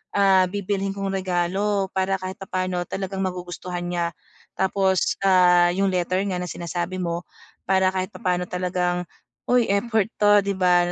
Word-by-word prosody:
ah, 195 Hz, -2 st, +5 dB
bibilhin 195 Hz, -1 st, -2 dB
kong 195 Hz, -1 st, -3 dB
regalo 190 Hz, +2 st, 0 dB
para 190 Hz, 0 st, +1 dB
kahit 185 Hz, 0 st, -6 dB
papaano 185 Hz, -2 st, -2 dB
talagang 195 Hz, 0 st, -4 dB
magugustuhan 180 Hz, -1 st, -5 dB
niya. 175 Hz, -1 st, -1 dB, 0.5 s
Tapos, 190 Hz, 0 st, +1 dB
ah, 180 Hz, -2 st, +5 dB
yung 195 Hz, +1 st, +1 dB
letter 185 Hz, +1 st, 0 dB
nga 180 Hz, -, -2 dB
na 180 Hz, -, -4 dB
sinasabi 175 Hz, +2 st, -4 dB
mo 170 Hz, 0 st, -3 dB, 0.4 s
para 190 Hz, 0 st, +3 dB
kahit 185 Hz, +1 st, -2 dB
papaano 180 Hz, -2 st, -1 dB
talagang, 180 Hz, 0 st, -1 dB, 0.5 s
uy, 245 Hz, -2 st, +4 dB
effort 220 Hz, +1 st, +1 dB
to, 205 Hz, 0 st, +6 dB
'di 200 Hz, 0 st, -1 dB
ba, 180 Hz, -1 st, +3 dB
185 Hz, 150 wpm, -23 LUFS, 180-195 Hz, 0.5 s, to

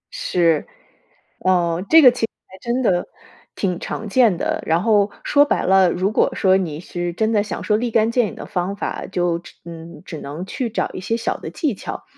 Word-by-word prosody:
是， 170 Hz, -, +1 dB, 0.7 s
呃， 175 Hz, -1 st, +1 dB
这 320 Hz, 0 st, +8 dB
个 255 Hz, -, +9 dB
其 245 Hz, -, -8 dB
实 225 Hz, -, +2 dB, 0.2 s
还 190 Hz, -, -14 dB
真 245 Hz, +2 st, -1 dB
的 180 Hz, -5 st, +1 dB, 0.5 s
挺 180 Hz, -3 st, -1 dB
常 220 Hz, -, -5 dB
见 220 Hz, -5 st, +3 dB
的， -, -, -2 dB
然 165 Hz, +3 st, +1 dB
后 205 Hz, -3 st, +3 dB
说 285 Hz, 0 st, +4 dB
白 290 Hz, -, 0 dB
了， 190 Hz, -1 st, +4 dB
如 185 Hz, +4 st, 0 dB
果 -, -, +2 dB
说 190 Hz, -1 st, +3 dB
你 165 Hz, -6 st, -2 dB
是 175 Hz, 0 st, -4 dB
真 220 Hz, +5 st, 0 dB
的 210 Hz, -, +3 dB
想 210 Hz, -, -5 dB
说 210 Hz, -, +2 dB
立 240 Hz, +2 st, -1 dB
竿 225 Hz, 0 st, +2 dB
见 240 Hz, -2 st, +2 dB
影 -, -, -8 dB
的 -, -, -8 dB
方 185 Hz, 0 st, -3 dB
法， -, -, -4 dB
就 175 Hz, -2 st, 0 dB
只 175 Hz, -, -15 dB
嗯， 165 Hz, -1 st, -10 dB
只 160 Hz, -4 st, -7 dB
能 150 Hz, +6 st, -6 dB
去 240 Hz, +4 st, -3 dB
找 220 Hz, -, -1 dB
一 -, -, -6 dB
些 225 Hz, +5 st, -1 dB
小 235 Hz, -, -2 dB
的 -, -, -7 dB
技 295 Hz, -8 st, -1 dB
巧。 -, -, -7 dB
190 Hz, 230 characters per minute, -20 LUFS, 175-225 Hz, 0.7 s, 个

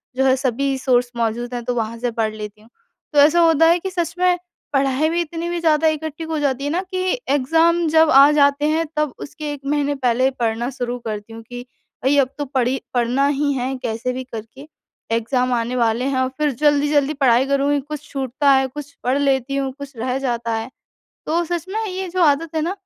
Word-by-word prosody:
जो 265 Hz, -, +1 dB
है 260 Hz, -1 st, +4 dB
सभी 265 Hz, +1 st, -1 dB
सोर्स 250 Hz, -2 st, +1 dB
मौजूद 235 Hz, +2 st, -2 dB
हैं 240 Hz, -, -4 dB
तो 245 Hz, -, -1 dB
वहाँ 230 Hz, 0 st, -2 dB
से 245 Hz, 0 st, -1 dB
पढ़ 225 Hz, -1 st, -1 dB
लेती 210 Hz, 0 st, -8 dB
हूँ। 220 Hz, -, -20 dB, 0.4 s
तो 290 Hz, -, +4 dB
ऐसा 305 Hz, +4 st, +6 dB
होता 325 Hz, -1 st, +5 dB
है 345 Hz, +1 st, +4 dB
कि 380 Hz, -, -4 dB
सच 345 Hz, -2 st, -2 dB
में 360 Hz, 0 st, +3 dB, 0.4 s
पढ़ाई 275 Hz, +2 st, +2 dB
भी 340 Hz, +1 st, 0 dB
इतनी 335 Hz, +1 st, -4 dB
भी 345 Hz, 0 st, -2 dB
ज़्यादा 320 Hz, -1 st, +3 dB
इकट्ठी 315 Hz, 0 st, -2 dB
हो 320 Hz, -1 st, -3 dB
जाती 275 Hz, -2 st, -1 dB
है 285 Hz, -, -1 dB
ना 355 Hz, +3 st, 0 dB
कि 370 Hz, +4 st, -1 dB
एग्ज़ाम 325 Hz, +5 st, +3 dB
जब 320 Hz, 0 st, +5 dB
आ 275 Hz, +2 st, +8 dB
जाते 285 Hz, 0 st, +3 dB
हैं 320 Hz, +2 st, +1 dB
तब 300 Hz, -4 st, 0 dB
उसके 300 Hz, +1 st, -6 dB
1 285 Hz, -, -9 dB
महीने 290 Hz, 0 st, 0 dB
पहले 255 Hz, -1 st, +2 dB
पढ़ना 230 Hz, +1 st, -1 dB
शुरू 245 Hz, -2 st, -4 dB
करती 215 Hz, 0 st, -5 dB
हूँ 225 Hz, -, -9 dB
कि 245 Hz, +2 st, -9 dB, 0.4 s
भई 275 Hz, +3 st, +3 dB
अब 260 Hz, -2 st, +2 dB
तो 290 Hz, -, -3 dB
पढ़ी 260 Hz, -1 st, -1 dB
पढ़ना 250 Hz, +3 st, +2 dB
ही 285 Hz, 0 st, 0 dB
है 260 Hz, 0 st, -2 dB
कैसे 230 Hz, +2 st, -2 dB
भी 260 Hz, +1 st, -4 dB
करके 250 Hz, +3 st, -10 dB, 0.4 s
एग्ज़ाम 250 Hz, +2 st, 0 dB
आने 240 Hz, +1 st, -1 dB
वाले 235 Hz, 0 st, +1 dB
हैं 275 Hz, -1 st, 0 dB
और 260 Hz, 0 st, +1 dB
फिर 300 Hz, -1 st, +1 dB
जल्दी-जल्दी 290 Hz, +1 st, +2 dB
पढ़ाई 255 Hz, -2 st, +4 dB
करूँगी, 280 Hz, +1 st, +1 dB
कुछ 300 Hz, +1 st, -7 dB
छूटता 270 Hz, +1 st, 0 dB
है, 265 Hz, 0 st, +4 dB
कुछ 290 Hz, +2 st, -9 dB
पढ़ 255 Hz, +3 st, +1 dB
लेती 275 Hz, -1 st, +1 dB
हूँ, 270 Hz, -1 st, -1 dB
कुछ 280 Hz, -1 st, -9 dB
रह 250 Hz, +3 st, -1 dB
जाता 235 Hz, -3 st, -2 dB
है। 225 Hz, +2 st, -4 dB, 0.6 s
तो 340 Hz, +2 st, +1 dB
सच 340 Hz, -1 st, -3 dB
में 440 Hz, +3 st, -2 dB
ये 380 Hz, -1 st, -4 dB
जो 360 Hz, +1 st, 0 dB
आदत 310 Hz, +1 st, +2 dB
है 315 Hz, -, +1 dB
ना 345 Hz, -, -1 dB
275 Hz, 220 wpm, -20 LUFS, 245-305 Hz, 0.6 s, आ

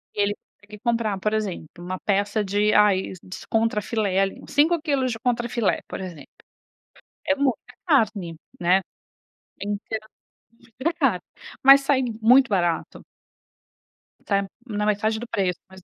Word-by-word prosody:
e 205 Hz, -, +1 dB
ele 205 Hz, 0 st, +1 dB, 0.3 s
consegue 210 Hz, 0 st, -13 dB
comprar, 230 Hz, -4 st, 0 dB
por 215 Hz, +2 st, -1 dB
exemplo, 200 Hz, -7 st, -2 dB
uma 180 Hz, +1 st, -5 dB
peça 205 Hz, +1 st, 0 dB
de 205 Hz, +2 st, +1 dB
ai 200 Hz, -3 st, +3 dB
diz 185 Hz, -, -9 dB
contrafilé 215 Hz, -3 st, 0 dB
ali, 195 Hz, 0 st, 0 dB
uns -, -, -13 dB
cinco 315 Hz, +4 st, +3 dB
quilos 275 Hz, -5 st, 0 dB
de 225 Hz, -, -5 dB
contrafilé, 235 Hz, -2 st, 0 dB
por -, -, -6 dB
exemplo. 170 Hz, -7 st, -8 dB, 1.0 s
É 285 Hz, -, +6 dB
muita 275 Hz, -4 st, -1 dB
carne, 215 Hz, -, +1 dB, 0.2 s
né, 180 Hz, +2 st, +3 dB, 0.8 s
então 205 Hz, +2 st, -3 dB, 0.8 s
muita 330 Hz, +5 st, +1 dB
carne, 250 Hz, -, +2 dB, 0.4 s
mas 275 Hz, +1 st, +9 dB
sai 275 Hz, -1 st, +2 dB, 0.2 s
muito 250 Hz, +4 st, +6 dB
barato. 175 Hz, -5 st, -1 dB, 1.2 s
Sai 200 Hz, -1 st, +2 dB, 0.3 s
na 210 Hz, -2 st, -2 dB
metade 215 Hz, +1 st, +1 dB
do 240 Hz, -, -7 dB
preço, 190 Hz, -6 st, -1 dB
mais 190 Hz, 0 st, -14 dB
ou -, -, -37 dB
210 Hz, 145 wpm, -24 LUFS, 195-240 Hz, 1.2 s, mas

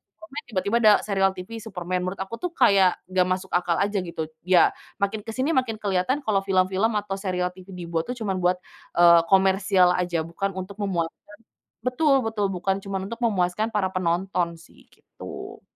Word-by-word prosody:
Superman 300 Hz, -2 st, -9 dB
tiba-tiba 200 Hz, 0 st, -1 dB
ada 215 Hz, -2 st, +7 dB
serial 195 Hz, -2 st, +2 dB
TV 225 Hz, +5 st, -7 dB
Superman, 185 Hz, -4 st, -3 dB
menurut 190 Hz, -, -4 dB
aku, 230 Hz, +4 st, -8 dB
tuh, 360 Hz, -, -3 dB
kayak 195 Hz, -2 st, +5 dB, 0.2 s
nggak 185 Hz, -1 st, +3 dB
masuk 185 Hz, +1 st, -2 dB
akal 175 Hz, -1 st, +1 dB
aja 205 Hz, -1 st, 0 dB
gitu. 160 Hz, -3 st, -5 dB, 0.2 s
Ya, 185 Hz, -2 st, +5 dB, 0.2 s
makin 200 Hz, +2 st, -1 dB
kesini 260 Hz, +7 st, -1 dB
makin 255 Hz, -6 st, +1 dB
kelihatan 210 Hz, +7 st, -1 dB
kalau 210 Hz, -3 st, +2 dB
film-film 190 Hz, +3 st, +2 dB
atau 195 Hz, -1 st, -3 dB
serial 180 Hz, -2 st, -1 dB
TV 185 Hz, +1 st, -13 dB
dibuat, 170 Hz, -1 st, -3 dB
tuh, 250 Hz, -, -3 dB
cuman 200 Hz, -5 st, -2 dB
buat, 180 Hz, 0 st, +2 dB, 0.4 s
eee, 170 Hz, -1 st, +7 dB
komersial 190 Hz, -1 st, +4 dB
aja 175 Hz, -3 st, -1 dB
bukan 190 Hz, +4 st, -4 dB
untuk 190 Hz, +2 st, -7 dB
memuaskan 170 Hz, -5 st, -1 dB, 0.7 s
betul 270 Hz, 0 st, +2 dB
betul, 210 Hz, -3 st, -1 dB
bukan 195 Hz, +1 st, -1 dB
cuman 195 Hz, -1 st, -4 dB
untuk 230 Hz, +1 st, -7 dB
memuaskan 210 Hz, -1 st, +1 dB
para 200 Hz, -3 st, -1 dB
penonton, 175 Hz, -1 st, -1 dB
sih, 165 Hz, -, -20 dB
gitu. -, -, -10 dB
195 Hz, 170 wpm, -24 LUFS, 180-215 Hz, 0.7 s, ada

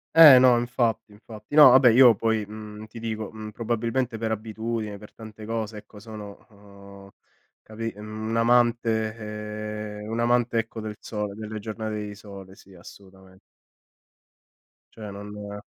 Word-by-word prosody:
Eh 155 Hz, -5 st, +10 dB
no 125 Hz, -2 st, +5 dB
infatti, 115 Hz, -2 st, -1 dB
infatti. 105 Hz, +4 st, -11 dB
No 145 Hz, -4 st, +10 dB
vabbè 130 Hz, -1 st, +7 dB
io 120 Hz, 0 st, +7 dB
poi, 110 Hz, 0 st, -1 dB
mhmm, 105 Hz, 0 st, -10 dB
ti 110 Hz, +2 st, -11 dB
dico, 110 Hz, -2 st, -5 dB
mhmm, 110 Hz, -1 st, -8 dB
probabilmente 115 Hz, +2 st, -2 dB
per 110 Hz, 0 st, -2 dB
abitudine, 110 Hz, -1 st, -4 dB
per 105 Hz, -, -14 dB
tante 110 Hz, -1 st, -12 dB
cose 110 Hz, -1 st, -4 dB
ecco, 105 Hz, -, -14 dB
sono, 105 Hz, -1 st, -10 dB
uhm, 100 Hz, -1 st, -15 dB, 0.5 s
capi 115 Hz, +1 st, -6 dB
un 110 Hz, +2 st, -5 dB
amante 115 Hz, -2 st, +2 dB, 0.9 s
ehm, 105 Hz, -, -8 dB
un 115 Hz, -, -2 dB
amante 120 Hz, 0 st, +2 dB
ecco, 115 Hz, 0 st, -5 dB
del 105 Hz, -1 st, -7 dB
sole, 105 Hz, -2 st, -5 dB
delle 110 Hz, +1 st, -7 dB
giornate 110 Hz, 0 st, -5 dB
di 105 Hz, -, -7 dB
sole 100 Hz, -2 st, -12 dB
sì 95 Hz, 0 st, -18 dB
assolutamen 95 Hz, +1 st, -16 dB, 1.5 s
Cioè 105 Hz, -2 st, -9 dB
non 105 Hz, 0 st, -8 dB
110 Hz, 145 wpm, -25 LUFS, 105-115 Hz, 1.5 s, Eh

